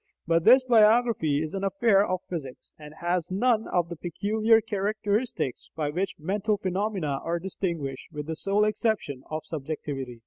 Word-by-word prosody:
But 165 0 +2
this 255 +3 +8
biography 220 - +4
is 155 - -6
an 195 0 -3
affair 195 +1 +3
of 185 -3 -2
physics, 140 -8 -7
and 150 -1 -10
has 175 0 -1
none 220 +4 +1
of 175 -2 0
the 170 - -6
peculiar 215 +7 +2
characteristics 210 - -2
by 150 -2 -1
which 185 +5 -2
"mental" 205 +6 -1
phenomena 190 -7 -2
are 170 +1 -1
distinguished, 170 -7 -4
with 150 -2 -5
the 160 +1 -4
sole 200 +5 +1
exception 215 - -1
of 155 0 -4
subjectivity. 140 -5 -5
185 Hz, 160 wpm, -27 LUFS, 155-210 Hz, -, this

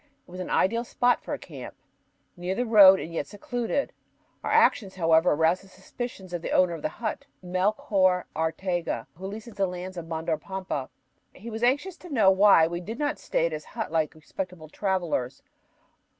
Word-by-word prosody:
It - - -16
was 185 - -8
an 185 - -5
ideal 230 +5 +2
spot 245 0 +1
for - - -7
a - - -1
camp, - - -10 0.6
near 180 +1 -3
the 245 - 0
road 200 -4 +8
and 165 - -6
yet - - -2
secluded. 245 +6 -3 0.5
Our - - -2
actions, 195 -4 +3
however, 165 -1 +4
aroused 165 +5 +2
the - - -16
suspicions 190 0 -8
of 175 - -3
the - - -4
owner 180 -2 +3
of 165 - -6
the - - -1
hut, 235 +5 -5 0.2
Melchor 185 0 +1
Arteaga, 165 -5 -2
who 185 +5 -7
leases 220 +3 -8
the 200 -1 0
lands 180 +1 -6
of 165 -1 -6
Mandor 160 0 -2
Pampa. 190 -8 -4 0.5
He 230 +5 -9
was 220 +1 -5
anxious 285 +9 +1
to 360 - -12
know 220 -10 +5
why 190 -4 +6
we 170 +1 -3
did 220 +6 -6
not 295 +1 -1
stay 165 - 0
at 170 - -1
his 155 -1 -5
hut - - -3
like 160 -1 0
respectable 165 0 -7
travelers. 170 -10 -2
185 Hz, 190 wpm, -27 LUFS, 165-215 Hz, 0.6 s, road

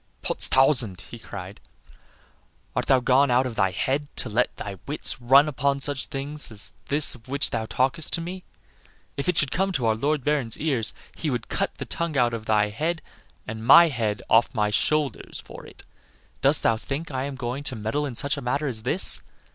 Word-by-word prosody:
"Potstausand!" 125 - +2
he 120 - -9
cried; 100 -2 -9 1.2
"art - - -1
thou 130 - +4
gone 130 +3 +3
out 125 +1 +3
of 125 - -4
thy 95 -3 +1
head 135 +10 -2
to 125 - -1
let 120 +4 0
thy 100 -3 -7
wits 140 -2 -2
run 135 +5 +6
upon 140 -1 0
such 140 -1 -1
things 145 +2 -1
as 105 -1 +5
this 145 +1 +3
of 120 -1 -16
which 140 +2 0
thou 110 - -3
talkest 135 +8 0
to - - +4
me? 180 +2 -6 0.7
If 140 +5 -2
it 180 - 0
should 140 -4 +1
come 195 +2 0
to 130 -8 -1
our 110 - +3
Lord 140 +5 -1
Baron's 140 -6 0
ears 135 -8 -1 0.2
he 160 - -3
would 125 -4 -4
cut - - -2
the - - -6
tongue 170 -2 -3
from 120 -3 +2
out 110 -1 -5
thy 105 -1 +2
head 160 +10 -3 0.4
and 110 0 -6
my 165 +7 +8
head 110 -7 -2
from - - +3
off 115 - 0
my 105 -1 +1
shoulders 145 +3 -1
for - - -12
it. - - -15 0.6
Dost - - +4
thou 115 - +2
think 145 +7 -5
I 130 0 -2
am 140 -1 -5
going 130 +2 -4
to 130 - 0
meddle 115 +7 -2
in 125 - -7
such 140 +4 -1
a - - -5
matter 140 +5 -1
as 120 -6 -2
this? 145 +11 +3
130 Hz, 205 wpm, -24 LUFS, 115-145 Hz, 1.2 s, my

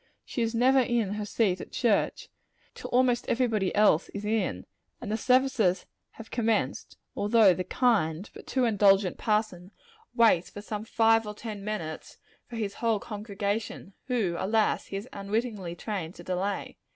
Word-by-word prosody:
She 245 - -4
is 230 0 -1
never 260 +3 +4
in 235 -5 +1
her 210 0 -4
seat 195 -5 +1
at - - -10
church, 230 -5 0 0.5
till - - -8
almost 245 -1 +2
every 255 +2 +2
body 210 -6 -1
else 205 -5 +4
is 200 +1 -5
in, 220 +1 -1 0.3
and 225 -4 -6
the - - +1
services 250 -6 +2 0.3
have 225 - -12
commenced; 225 -2 -1 0.2
although 210 -2 +5
the 185 - -3
kind, 195 -5 +1
but - - -12
too 260 -2 +1
indulgent 195 -4 +3
parson 210 -5 -1 0.5
waits 220 -7 +4
some 210 0 -5
five 225 -1 +3
or 210 - -6
ten 210 -2 -7
minutes 175 -7 -5 0.3
for 240 - -9
his 210 -3 -3
whole 225 -2 0
congregation 205 -1 -4
whom, 215 -10 0
alas! 215 +3 +1
he - - -7
has 200 +5 -5
unwittingly 200 -3 -3
trained 180 -3 -5
to - - -11
delay. 190 +2 -3
210 Hz, 160 wpm, -28 LUFS, 195-230 Hz, 0.5 s, although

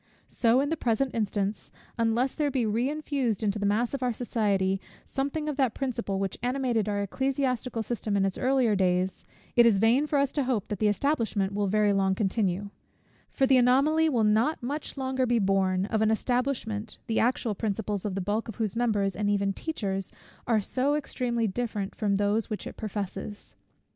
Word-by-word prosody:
So 235 +2 +3
in 285 - -1
the 325 - +1
present 255 +1 0
instance, 205 -1 -2 0.3
unless 230 +3 +1
there 300 -2 0
be 260 -4 0
reinfused 255 0 -1
into 210 0 0
the 205 - +1
mass 230 +5 +1
of 275 - -3
our 250 -2 +1
society, 200 -5 0 0.2
something 285 +3 -2
of 295 -2 -2
that 260 -5 +1
principle, 235 -7 -2
which 195 -1 -3
animated 245 -4 0
our 205 0 0
ecclesiastical 255 0 -1
system 215 -2 -2
in 195 - +2
its 195 - -1
earlier 255 -4 +2
days, 185 0 0 0.3
it 240 -1 +7
is 215 -4 +4
vain 235 +8 +3
for 295 - +1
us 280 -1 +2
to 285 -3 -1
hope 245 -6 -1
that 205 - -3
the 215 - +3
establishment 210 -4 0
will 205 0 0
very 210 +1 +3
long 195 -1 +2
continue: 200 -1 -1 0.6
for 270 - +1
the 265 0 +5
anomaly 280 +6 +4
will 240 -6 +2
not 220 +8 +2
much 290 +3 -4
longer 260 -1 0
be 240 0 +2
borne, 190 -2 +2
of 220 +1 -1
an 220 - +3
establishment, 230 -2 -1
the 225 - 0
actual 240 -1 +1
principles 205 -1 -2
of 200 -3 -3
the 195 - -1
bulk 210 +5 -1
of 225 - -7
whose 220 -3 -2
members, 205 -5 +1
and 205 0 0
even 200 -1 +1
teachers, 195 - -3 0.4
are 230 -2 +3
so 260 +7 0
extremely 245 -5 -1
different 210 -2 -3
from 205 -2 0
those 205 +2 +1
which 215 - -4
it - - -7
professes. 205 -1 -6
225 Hz, 190 wpm, -27 LUFS, 200-255 Hz, 0.6 s, it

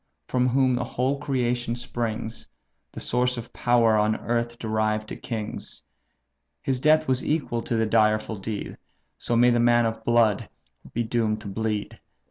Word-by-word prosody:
from 125 0 +1
whom 130 0 +3
the 125 0 0
whole 130 +3 -1
creation 125 -4 -1
springs, 115 -2 -4 0.4
The - - -8
source 125 +1 0
of 120 0 -8
power 120 -2 +3
on 105 +1 +2
earth 120 0 -2
derived 110 -1 -1
to - - -5
kings! 110 -3 -6 0.8
His 130 -2 0
death 155 +3 +4
was 130 -1 +1
equal 145 -6 -1
to 115 - -2
the 110 0 +2
direful 110 0 +2
deed; 100 +1 -5 0.4
So 120 - -1
may 120 +1 +5
the 120 - +2
man 120 0 +4
of 110 0 -3
blood 115 -3 +2 0.4
be 120 - -1
doomed 110 -2 0
to 105 - -8
bleed! 105 +1 -3
120 Hz, 160 wpm, -25 LUFS, 110-125 Hz, 0.8 s, may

